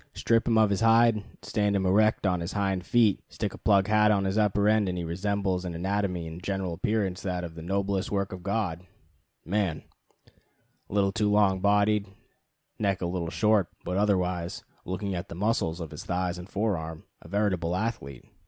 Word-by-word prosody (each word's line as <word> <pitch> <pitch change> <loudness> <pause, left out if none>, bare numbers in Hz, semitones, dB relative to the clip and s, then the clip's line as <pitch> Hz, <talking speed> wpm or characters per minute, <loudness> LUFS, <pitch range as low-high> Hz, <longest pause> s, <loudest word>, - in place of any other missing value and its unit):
Strip 115 0 +2
him 115 -2 +3
of 110 -2 +4
his 100 - 0
hide, 115 -1 +4 0.2
stand 105 -1 0
him 95 -1 0
erect 105 +3 +3
on 90 -2 +2
his 85 +1 -4
hind 95 -3 0
feet, 110 0 +3
stick - - -4
a - - -9
plug 100 -2 +3
hat 105 0 +4
on 100 -2 +2
his 95 +1 -1
upper 105 -1 +2
end, 105 -2 +3
and 90 - -3
he 85 - -3
resembles 95 +2 -1
in 90 -2 -5
anatomy 95 -1 -1
and 80 +2 -8
general 95 -2 -2
appearance 95 0 -1
that 90 -3 -4
"noblest 95 +3 -1
work 100 -1 -1
of 90 - -7
God" 100 -4 -2 0.6
man: 95 -3 -1 1.1
a - - -9
little 100 -1 +3
too 105 +1 0
long 100 -2 +3
bodied, 105 +1 +2 0.7
neck 100 -3 0
a - - +1
little 85 -1 -2
short, 105 0 +2 0.2
but 90 - -2
otherwise, 90 -4 0 0.2
looking 95 +2 -3
at 90 +2 -5
the - - -7
muscles 95 -4 0
of 80 -3 -6
his - - -8
thighs 90 0 -2
and 90 +2 -10
forearm, 85 -7 -2 0.2
a - - -13
veritable 90 -3 0
athlete. 90 - -4
95 Hz, 185 wpm, -27 LUFS, 90-105 Hz, 1.1 s, of